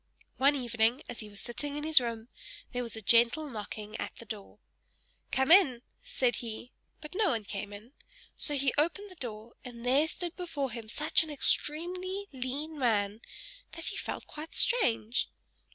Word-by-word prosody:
One 280 +2 +5
evening, 240 0 +1
as - - -7
he 215 - -7
was 205 -1 -11
sitting 285 +4 -4
in 295 - -4
his 315 -3 +6
room, 230 -1 -4 0.5
there 245 - -1
was 235 -3 -3
a 220 - -7
gentle 235 +9 +4
knocking 215 -3 -6
at - - -5
the 235 - -11
door. 210 -3 -7 0.7
"Come 265 +4 +2
in!" 280 -11 +7 0.2
said 485 - +1
he; 230 +1 -6 0.3
but 300 +2 -9
no 410 0 +3
one 230 -6 0
came 200 +1 -5
in; 210 +6 -11 0.4
so 295 - -1
he 275 -1 +2
opened 380 +6 0
the - - -12
door, 230 -5 -6
and 240 -1 -9
there 275 +5 +4
stood 345 +1 -4
before 295 -7 -3
him 225 -1 -7
such 300 +6 +4
an 320 - -4
extremely 360 +7 +1
lean 280 +4 -4
man, 215 -3 +1 0.5
that 330 0 -7
he - - -6
felt - - -4
quite 310 +1 -9
strange. 240 - +2
255 Hz, 175 wpm, -31 LUFS, 230-310 Hz, 0.7 s, in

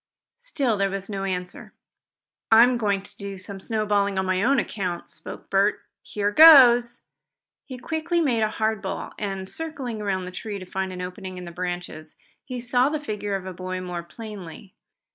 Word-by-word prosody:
Still 285 - -1
there 195 0 +1
was 195 +1 -5
no 195 -1 -3
answer. 180 -1 -5 0.8
"I'm 240 +2 +6
going 200 -3 0
to - - -13
do 200 -1 -6
some 195 +1 -8
snowballing 205 -2 0
on 190 - +1
my 185 0 +1
own 270 +6 +3
account," 185 -7 -3
spoke - - -10
Bert. 200 +2 +3 0.2
"Here 205 0 -2
goes!" 245 -5 +8 0.6
He 255 - -8
quickly 320 +6 -1
made 255 -9 +1
a 215 - +2
hard 220 -1 -1
ball, 190 - -5
and, 195 -2 -4
circling 270 - -5
around 190 -3 -1
the 180 - -7
tree 205 +2 -5
to 185 - -8
find 190 +1 -3
an 180 0 -5
opening 185 0 -7
in 180 - -7
the 170 - -8
branches, 175 -3 -5 0.3
he 255 -2 -6
saw 245 +2 +2
the 305 0 -2
figure 210 -7 -3
of 195 - -4
the 185 0 -6
boy 185 +1 -5
more 180 -1 -5
plainly. 195 0 -10
200 Hz, 180 wpm, -24 LUFS, 185-240 Hz, 0.8 s, goes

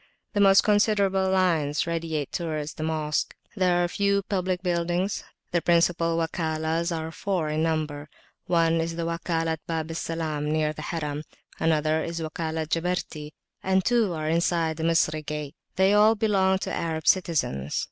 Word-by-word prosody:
The 205 - 0
most 195 -1 +6
considerable 200 -3 +2
lines 165 -6 +2
radiate 165 -4 -2
towards 155 -3 -3
the - - -9
Mosque. 155 -1 -1 0.2
There 180 -3 +2
are - - +1
few 200 +2 +1
public 185 -2 -2
buildings. 175 +2 0 0.3
The 175 -2 +1
principal 170 -1 +2
Wakalahs 160 0 -1
are 160 -1 -3
four 175 -2 -2
in 155 +1 -1
number; 155 -2 -2 0.4
one 165 -1 +3
is 165 0 -3
the 170 0 -2
Wakalat 165 -1 -1
Bab 165 -1 -3
Salam 155 -3 -2
near 155 -1 +1
the - - -8
Harim, 150 -3 -3 0.4
another 155 0 +2
the 165 -1 -4
Wakalat 160 -1 -3
Jabarti, 165 -3 -2 0.3
and 190 0 +1
two 230 -6 +2
are 155 -1 -3
inside 165 -1 +1
the 160 - -4
Misri 160 -2 +2
gate; 150 0 -5 0.2
they 190 +1 +4
all 215 +2 +6
belong 195 -3 +2
to - - -4
Arab 160 -2 -2
citizens. 145 - +1
165 Hz, 155 wpm, -26 LUFS, 155-185 Hz, 0.4 s, most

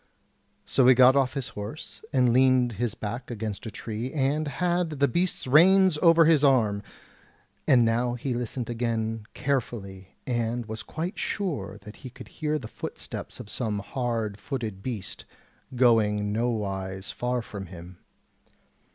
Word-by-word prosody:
So 130 - +3
he 130 - +8
got 130 +1 +7
off 135 -1 +2
his 135 -2 -3
horse, 105 +9 -7
and 125 -4 +3
leaned 130 -1 +4
his 115 +1 -2
back 120 +4 -5
against 110 -1 -5
a - - -3
tree, 110 +4 -5
and 150 +1 0
had 175 +4 0
the 140 - +4
beast's 175 +2 -1
reins 175 +4 +5
over 165 -1 +6
his 155 -2 +4
arm; 110 -8 +3 0.9
and 120 -3 +6
now 120 +2 +1
he 125 +1 -3
listened 120 0 -3
again 115 -2 -2
carefully, 100 -8 -3
and 120 -1 -1
was 110 0 -6
quite 170 +6 -5
sure 110 - -3
that 105 - -11
he 130 - -9
could 130 +1 -12
hear 155 0 -2
the 125 -7 -7
footsteps - - -7
of - - -8
some 105 -1 -2
hard 115 -1 -3
footed 110 -6 -4
beast 110 -4 -6 0.5
going 105 -4 +3
nowise 100 -5 -2
far 125 -1 -2
from 100 -4 -8
him. 90 0 -11
120 Hz, 150 wpm, -27 LUFS, 105-135 Hz, 0.9 s, he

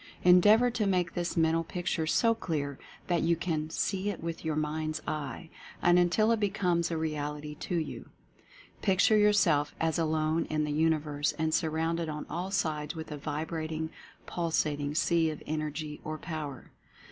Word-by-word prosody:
Endeavor 210 +7 +6
to 220 -3 0
make 180 -3 +1
this 175 0 -2
Mental 165 0 +3
Picture 170 -2 -2
so 230 +7 +3
clear 145 -10 -3 0.3
that 175 -2 +1
you 170 +1 +3
can 160 -2 -2
"see 195 +4 -1
it 200 - -4
with 165 -1 -4
your 160 -2 -1
mind's 155 +1 -2
eye," 155 +2 -4 0.3
and 175 0 +5
until 195 +6 +3
it 230 - +2
becomes 180 -4 +1
a 165 - -2
real 150 -2 -2
ity 150 0 -7
to 175 - -4
you. 160 -2 -4 0.7
Picture 195 +2 +4
yourself 200 -9 +3
as 165 0 +1
alone 160 0 +1
in 155 0 -1
the 150 - -2
Universe 150 -2 +1
and 160 -1 -1
surrounded 160 +1 0
on 150 0 -5
all 180 +3 -3
sides 155 -4 -1
with 160 -1 -7
a 150 - -4
vibrating, 155 +2 -3 0.3
pulsat 160 -3 0
ing 145 +1 -3
sea 165 0 +3
of 155 - -7
Energy, 155 0 -4
or 155 0 -4
Power. 155 -5 -6
160 Hz, 170 wpm, -30 LUFS, 155-175 Hz, 0.7 s, Endeavor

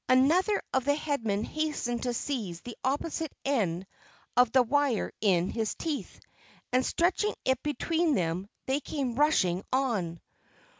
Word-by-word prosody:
Another 325 +11 +4
of 265 - +2
the 285 0 +3
Headmen 230 -9 -1
hastened 295 -6 -2
to 245 -1 -1
seize 210 -12 -3
the 240 - -8
opposite 295 +3 -1
end 195 -10 0 0.5
of 245 -2 +5
the 260 0 +5
wire 275 -1 +1
in 185 -4 +3
his 220 -2 -1
teeth 310 -3 -4 0.5
and, 255 +1 +4
stretching 365 +9 +1
it 260 -1 +2
between 320 +2 +1
them, 180 +2 -1 0.2
they 265 +2 +1
came 275 -4 -3
rushing 215 - +2
on. 215 -11 0
260 Hz, 140 wpm, -29 LUFS, 215-295 Hz, 0.5 s, of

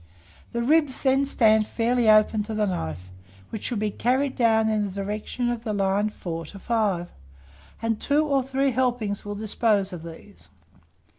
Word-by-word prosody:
The 235 0 -2
ribs 295 0 +2
then 270 +1 +3
stand 220 -5 +3
fairly 235 0 +1
open 215 0 +5
to 220 0 -5
the 215 0 +1
knife, 90 - -4 0.4
which 220 - -5
should 240 - -1
be 210 0 -1
carried 260 +6 0
down 220 -2 +3
in 215 -1 +1
the - - -7
direction 210 +5 -3
of 235 -1 -4
the 215 -3 -2
line 200 +1 +1
4 165 -5 -6
to 200 - -11
5; 200 -5 -1 0.7
and 225 -1 -1
two 295 +2 +2
or 280 -2 +2
three 270 +1 0
helpings 245 -5 -1
will 205 0 -5
dispose 205 -2 0
of 175 - -7
these. 165 +5 -12
220 Hz, 170 wpm, -25 LUFS, 200-245 Hz, 0.7 s, open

